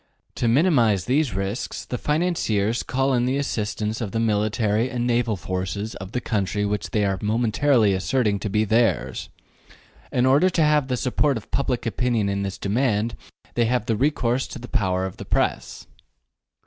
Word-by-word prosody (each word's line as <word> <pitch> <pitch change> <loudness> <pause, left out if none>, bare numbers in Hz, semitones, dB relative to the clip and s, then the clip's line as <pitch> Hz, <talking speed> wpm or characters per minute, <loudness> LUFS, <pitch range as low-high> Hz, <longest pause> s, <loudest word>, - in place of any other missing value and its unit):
To 120 - -1
minimize 115 - +3
these 135 -3 +1
risks 95 +4 -3
the 125 - -4
financiers 135 - 0
call 135 +1 0
in 120 -1 +2
the 130 +2 0
assistance 110 -4 -2
of 105 -4 -4
the 115 - 0
military 110 +1 +1
and 120 -1 -2
naval 120 -2 +1
forces 95 +4 -4
of 95 0 -8
the 125 - -1
country 105 -3 -1
which 105 0 -2
they 105 -2 +1
are 95 -1 -1
momentarily 115 +1 +2
asserting 100 +3 0
to 105 - -3
be 105 +2 +1
theirs. 110 - +1 0.8
In 125 0 +2
order 140 +8 +4
to 165 -3 +1
have 150 -2 +3
the 125 -1 -1
support 135 +2 +1
of 110 - -11
public 130 -3 -1
opinion 115 -3 0
in 100 0 -1
this 95 -1 -4
demand 110 +1 0 0.4
they 120 - +2
have 120 -2 0
recourse 125 +1 +1
to - - -8
the 120 0 -9
power 95 -4 0
of 95 - -6
the - - -7
Press. - - -2
115 Hz, 175 wpm, -23 LUFS, 105-125 Hz, 0.8 s, order